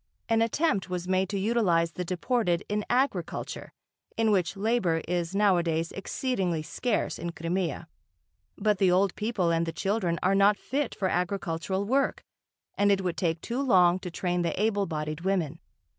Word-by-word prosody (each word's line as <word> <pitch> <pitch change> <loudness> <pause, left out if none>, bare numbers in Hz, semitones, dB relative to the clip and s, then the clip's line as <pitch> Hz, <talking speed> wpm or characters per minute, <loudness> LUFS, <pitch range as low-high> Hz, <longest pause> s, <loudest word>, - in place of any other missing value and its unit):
An 225 0 +2
attempt 230 - +1
was 180 -1 -3
made 185 0 +1
to 200 - -2
utilise 190 -6 +2
the 180 - -4
deported 180 0 0
in 210 0 -1
agriculture, 245 -9 -1 0.5
in 225 -1 +3
which 190 -1 +1
labour 195 -6 +1
is 175 +1 -2
nowadays 170 -5 +2
exceedingly 190 -7 -2
scarce 235 +7 -2
in 170 - -3
Crimea. 170 +1 -2 0.7
But 210 -3 +1
the 190 -2 +4
old 185 +1 +3
people 210 -6 0
and 165 0 +1
the - - -1
children 190 -2 -1
are 185 +2 +3
not 200 +1 +4
fit 280 -1 -2
for 190 - 0
agricultural 185 +1 -1
work 270 +5 +1 0.5
and 205 0 +3
it 195 -1 +2
would 180 -2 -1
take 165 -2 -1
too 245 +3 -2
long 185 -8 +4
to 185 - -6
train 175 +1 -1
the 170 +1 -2
able 205 -2 +1
bodied 155 -1 -4
women. 170 -4 -1
190 Hz, 165 wpm, -28 LUFS, 170-210 Hz, 0.7 s, the